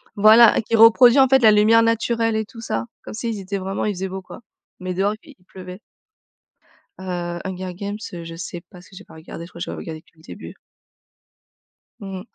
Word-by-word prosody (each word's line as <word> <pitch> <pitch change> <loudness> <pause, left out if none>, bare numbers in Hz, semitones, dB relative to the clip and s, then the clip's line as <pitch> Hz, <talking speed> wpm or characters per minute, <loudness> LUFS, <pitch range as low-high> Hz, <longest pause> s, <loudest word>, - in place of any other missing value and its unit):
Voilà! 215 +2 +6
Qui 225 +1 -2
reproduit, 235 +4 +6
en 265 - +6
fait, 265 +1 +4
la 220 -3 +6
lumière 220 +2 +4
naturelle 230 0 0
et 220 0 -2
tout 230 +1 -13
ça, 115 - -3 0.2
comme - - -9
s'ils 225 -1 -4
étaient 195 +1 -5
vraiment 195 +2 -4
il 210 - -1
faisait 190 +1 -5
beau 190 0 -6
quoi, 185 - -13 0.4
mais 185 0 -5
dehors 200 +3 0
i 295 -4 -16
il 180 - -31
pleuvait. 185 0 -11 1.2
Heu, 175 -2 -5
Hunger 185 -1 -6
Games, 205 +2 -5 0.2
heu, 170 -1 -7
je 165 0 -9
sais 175 0 -7
pas 180 - -14
si 185 +1 -18
j'ai - - -11
pas - - -18
regardé, 165 +1 -10
je - - -14
crois 170 - -13
j'avais - - -6
regardé 160 -1 -8
que - - -48
le 160 - -22
début. - - -11 1.4
Mmh. 195 -2 -7
195 Hz, 210 wpm, -21 LUFS, 180-225 Hz, 1.4 s, Voilà